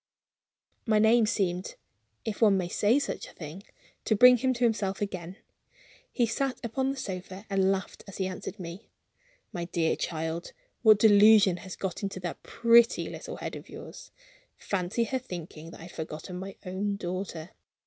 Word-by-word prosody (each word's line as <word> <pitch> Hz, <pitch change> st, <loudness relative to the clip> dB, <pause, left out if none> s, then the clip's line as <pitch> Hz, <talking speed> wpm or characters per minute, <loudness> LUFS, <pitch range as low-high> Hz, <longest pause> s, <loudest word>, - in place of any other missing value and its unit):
My 215 Hz, -1 st, +4 dB
name 220 Hz, +1 st, +5 dB
seemed 185 Hz, -4 st, -1 dB, 0.5 s
(if 220 Hz, 0 st, -4 dB
one 205 Hz, -3 st, +6 dB
may 180 Hz, -2 st, -1 dB
say 215 Hz, +8 st, +3 dB
such 285 Hz, -, -3 dB
a -, -, -14 dB
thing) 160 Hz, +3 st, -8 dB, 0.4 s
to 220 Hz, -, +2 dB
bring 250 Hz, +3 st, +8 dB
him 260 Hz, +2 st, +1 dB
to 240 Hz, -, -2 dB
himself 210 Hz, -4 st, +1 dB
again. 185 Hz, -2 st, -5 dB, 0.7 s
He 240 Hz, -, +2 dB
sat 270 Hz, +3 st, -2 dB
upon 260 Hz, +3 st, -1 dB
the 275 Hz, -, -3 dB
sofa 190 Hz, -1 st, -6 dB
and 195 Hz, -1 st, +3 dB
laughed 190 Hz, -1 st, -4 dB
as 195 Hz, -, -9 dB
he 190 Hz, -, -1 dB
answered 185 Hz, +2 st, -6 dB
me. 175 Hz, +2 st, -8 dB, 0.6 s
"My 175 Hz, -3 st, -3 dB
dear 170 Hz, -2 st, 0 dB
child, 160 Hz, +1 st, -4 dB, 0.3 s
what 215 Hz, -3 st, +7 dB
delusion 205 Hz, -3 st, +6 dB
has 185 Hz, -1 st, -8 dB
got 190 Hz, -3 st, -4 dB
into 195 Hz, -2 st, -4 dB
that 175 Hz, -1 st, -5 dB
pretty 235 Hz, 0 st, +4 dB
little -, -, -7 dB
head -, -, -5 dB
of -, -, -10 dB
yours? -, -, -10 dB, 0.5 s
Fancy 195 Hz, +4 st, -1 dB
her 260 Hz, +3 st, -2 dB
thinking 170 Hz, -8 st, -8 dB
that -, -, -12 dB
I -, -, -9 dB
had 175 Hz, -, -10 dB
forgotten 160 Hz, +3 st, -6 dB
my 195 Hz, +1 st, -7 dB
own 195 Hz, +2 st, -2 dB
daughter! 180 Hz, -3 st, -5 dB
195 Hz, 170 wpm, -28 LUFS, 180-220 Hz, 0.7 s, bring